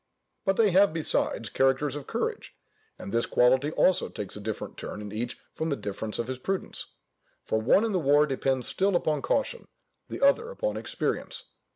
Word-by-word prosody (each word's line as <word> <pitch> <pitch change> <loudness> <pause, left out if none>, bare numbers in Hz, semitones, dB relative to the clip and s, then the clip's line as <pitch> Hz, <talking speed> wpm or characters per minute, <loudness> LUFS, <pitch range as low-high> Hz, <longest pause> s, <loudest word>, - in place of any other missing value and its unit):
But 195 - +2
they 215 -2 +4
have, 195 -1 +5
besides, 155 -7 -1
characters 135 +2 +1
of 145 -2 -7
courage; - - -3 0.4
and 100 - -8
this 115 0 +1
quality 130 +4 +3
also 185 - +3
takes - - -6
a - - -7
different - - -5
turn - - -7
in 105 -1 -7
each 115 +3 -4
from 160 - -2
the 140 - +1
difference 105 -1 -5
of 120 - -1
his 130 +1 -5
prudence; 190 +7 -4 0.6
for 110 - 0
one 190 - +4
in 225 - -1
the 190 - +1
war 145 0 +4
depends 135 -3 0
still 195 0 +1
upon 155 -4 +1
caution, 280 - -1 0.4
the - - -5
other 280 +13 +3
upon - - -2
experience. - - -3
145 Hz, 185 wpm, -27 LUFS, 125-195 Hz, 0.6 s, have